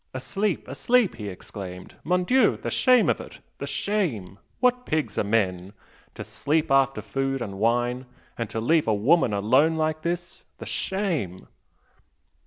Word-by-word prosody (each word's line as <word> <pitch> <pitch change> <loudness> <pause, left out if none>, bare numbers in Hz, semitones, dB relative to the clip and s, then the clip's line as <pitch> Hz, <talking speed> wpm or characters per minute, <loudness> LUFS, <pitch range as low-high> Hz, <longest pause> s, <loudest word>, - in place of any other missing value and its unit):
"Asleep 195 +9 -2
asleep!" 215 - +1
he 105 -2 -6
exclaimed 90 -1 -9
"Mon 180 +1 +1
Dieu! 255 +7 +3
the - - -5
shame 255 -3 +4
of - - +1
it! - - -11 0.2
the - - -4
shame! 135 - -2 0.2
What 250 0 +2
pigs 155 - -2
are - - +2
men! 100 -3 0 0.4
To - - -6
sleep 155 +1 -1
after 135 -5 +3
food 135 +5 -2
and 100 -5 -6
wine, 120 +3 0 0.3
and 115 -3 -4
to 115 - -3
leave 155 +6 +2
a 110 - +3
woman 125 +5 +3
alone 130 +11 +3
like 155 0 -1
this!... 175 +1 -4
the - - -8
shame!" 170 - -2
135 Hz, 155 wpm, -25 LUFS, 105-175 Hz, 0.4 s, shame